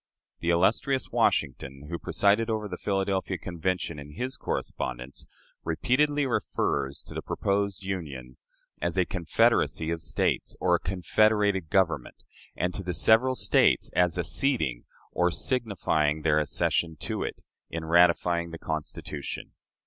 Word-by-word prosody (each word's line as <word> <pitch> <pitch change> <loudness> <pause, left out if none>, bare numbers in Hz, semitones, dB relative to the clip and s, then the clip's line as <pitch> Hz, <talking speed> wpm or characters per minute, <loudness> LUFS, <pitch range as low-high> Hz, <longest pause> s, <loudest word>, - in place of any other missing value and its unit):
The 85 - -2
illustrious 110 - +2
Washington, 70 +1 0
who 85 - -3
presided 105 +3 +2
over 110 -1 -1
the - - -5
Philadelphia 95 -1 -1
Convention, 85 -3 -3
in 70 +1 -10
his 125 - -3
correspondence, 60 +2 -4 0.4
repeatedly 145 - +1
refers 70 - -1
to - - -11
the - - -4
proposed 100 -1 -1
Union 70 -10 -5 0.4
as 85 +1 -1
a 90 - +3
"Confederacy" 85 -2 +1
of 85 -1 -3
States, - - -1
or 90 -1 +2
a 85 - +4
"confederated 95 0 +1
Government," 85 -10 +1 0.4
and 90 +1 -1
to - - -4
the 90 -2 -3
several 115 - +4
States - - +3
as 90 -1 +3
"acceding," 90 - +1 0.3
or 90 0 +2
signifying 85 - 0
their 75 -1 +3
"accession," 80 +2 0
to - - -3
it, - - -5 0.3
in 80 -1 -5
ratifying 85 0 +3
the 85 - -7
Constitution. 80 -2 -5
90 Hz, 135 wpm, -27 LUFS, 80-100 Hz, 0.4 s, a